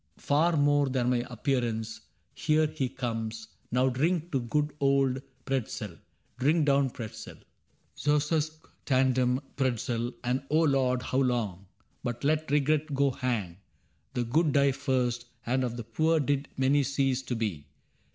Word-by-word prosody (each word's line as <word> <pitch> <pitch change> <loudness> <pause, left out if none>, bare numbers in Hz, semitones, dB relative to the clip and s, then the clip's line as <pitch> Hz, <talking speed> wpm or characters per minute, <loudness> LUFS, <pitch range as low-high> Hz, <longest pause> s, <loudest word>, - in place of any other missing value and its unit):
Far 160 +3 +2
more 145 -1 +3
than 125 -1 +1
my 120 -1 +1
appearance. 115 -3 -2 0.3
Here 155 0 +2
he 150 -4 -2
comes; 115 -3 -4 0.2
Now 125 +2 +3
drink 165 +6 0
to 135 - +1
good 145 +5 -1
old 135 -1 +2 0.2
Pretzel! 135 -4 -2 0.5
Drink 150 +4 +3
down 140 -1 +3
Pretzel! 115 -3 -8 0.6
^ousque 150 +2 0 0.2
tandem^ 130 -1 +2
Pretzel, 120 -2 0
and 125 +2 0
O 155 +2 +3
Lord, 130 -4 +2
How 130 - 0
long! 110 -8 -1 0.4
But 120 -1 -4
let 155 +1 +1
regret 150 +1 +1
go 140 0 +3
hang: 115 -10 -2 0.6
the 125 - +1
good 150 +5 +2
Die 140 -1 +4
first, 125 -3 -1 0.2
and 130 +2 +1
of 120 -1 -2
the 120 - -4
poor 155 +9 +1
did 140 0 0
many 135 +2 +3
cease 135 -1 +1
To 130 -2 -3
be. 105 -10 -3
130 Hz, 140 wpm, -29 LUFS, 120-145 Hz, 0.6 s, Die